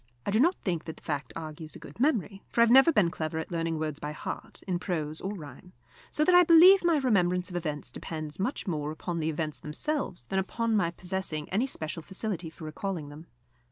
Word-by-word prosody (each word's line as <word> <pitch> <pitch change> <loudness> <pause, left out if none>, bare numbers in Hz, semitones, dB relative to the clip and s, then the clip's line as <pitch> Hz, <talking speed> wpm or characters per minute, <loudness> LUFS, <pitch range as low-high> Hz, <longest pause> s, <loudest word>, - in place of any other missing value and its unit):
I - - 0
do 215 - +3
not 345 +8 +4
think 170 -5 -1
that 160 - -7
the - - -17
fact 145 -2 -3
argues 155 -1 -7
a - - -9
good - - -12
memory, 220 - +1
for 235 - +2
I - - +9
have 235 - +4
never 270 +6 +8
been 205 - +3
clever 160 -2 -3
at 160 - -4
learning 165 -1 -1
words 155 -2 -3
by 150 +1 -4
heart, - - -7
in 180 -2 0
prose 155 -4 -3
or 200 +2 -3
rhyme; 160 +2 -11 0.4
so 305 - +1
that 365 - +4
I 355 - +9
believe 355 +4 +8
my 340 -2 +4
remembrance 180 -8 +2
of - - -7
events 155 -4 -3
depends 155 -1 -6
much 210 +9 -2
more 150 -6 -2
upon 170 +2 -4
the 160 0 0
events 155 -1 -3
themselves 180 - -3
than 190 +11 -1
upon 225 +4 -1
my 175 -5 +2
possessing 175 -4 -3
any 220 +8 +1
special 160 - -3
facility 190 -1 -3
for 160 0 -11
recalling 155 -1 -4
them. 150 +3 -11
175 Hz, 225 wpm, -29 LUFS, 155-215 Hz, 0.4 s, I